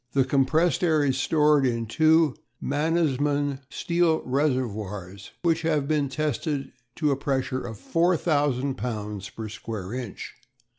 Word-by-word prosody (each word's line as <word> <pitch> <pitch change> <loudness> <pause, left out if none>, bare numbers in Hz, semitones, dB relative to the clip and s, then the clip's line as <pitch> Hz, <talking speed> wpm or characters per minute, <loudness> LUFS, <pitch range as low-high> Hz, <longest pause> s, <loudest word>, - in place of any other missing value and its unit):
The 135 -2 +3
compressed 145 +5 +2
air 155 -4 +3
is 135 -1 +1
stored 150 -1 +3
in 115 -3 0
two 155 +4 +3 0.2
Mannesmann 145 -2 0
steel 170 +2 +1
reservoirs 105 -9 -2
which 165 -1 +2
have 155 -4 0
been 150 -2 +1
tested 145 0 -2 0.2
to 150 -3 +1
a - - +2
pressure 135 -2 -1
of 115 -3 -6
4000 145 - +1
lbs. 105 -5 -5
per 110 -1 -5
square 105 -1 -6
inch. 125 -5 -6
140 Hz, 130 wpm, -26 LUFS, 125-155 Hz, 0.2 s, The